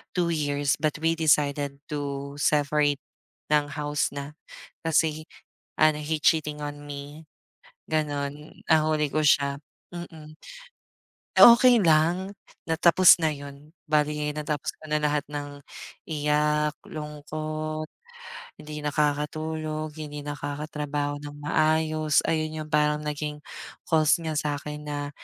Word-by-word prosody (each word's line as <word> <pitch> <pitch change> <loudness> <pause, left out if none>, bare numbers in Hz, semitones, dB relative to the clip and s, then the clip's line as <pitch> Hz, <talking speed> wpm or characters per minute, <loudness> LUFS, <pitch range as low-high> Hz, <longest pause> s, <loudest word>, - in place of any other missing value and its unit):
2 170 -1 +1
years, 145 -2 0
but 155 -1 0
we 165 +1 +2
decided 145 -3 +1
to 140 -1 -4
separate 145 -1 +2 0.5
ng 150 -1 +2
house 145 0 -1
na, 140 +2 -6 0.5
kasi 155 -1 +1 0.5
ano, 155 -1 +4
he 155 +1 -1
cheating 150 -2 +2
on 145 0 -6
me, 145 +2 -9 0.6
ganun. 150 -1 -3
Nahuli 155 -1 +3
ko 155 - +2
siya. 140 -1 +3 0.4
Mm. 160 -3 -9 1.1
Okey 240 0 +9
lang. 170 +5 +2 0.3
Na 160 - +1
tapos 175 +1 +7
na 160 - +3
yun. 145 +1 -10 0.2
Bale 150 -1 +3 0.2
natapos 150 -1 -3
ko 155 - -14
na 150 - +3
lahat 150 -1 +1
ng 145 -1 -6 0.5
iyak, 150 0 +1
lungkot, 155 +1 -5 0.8
hindi 150 0 -7
nakakatulog, 155 +1 -2
hindi 150 -1 -6
nakakatrabaho 145 0 -4
ng 145 0 -8
maayos, 155 0 +2
ayun 155 -1 -1
yung 155 - -15
parang 150 0 +2
naging 150 0 -3 0.5
cost 155 0 +4
niya 160 -1 -3
sa'kin 150 0 -3
na 145 -1 -4
150 Hz, 115 wpm, -26 LUFS, 145-155 Hz, 1.1 s, Okey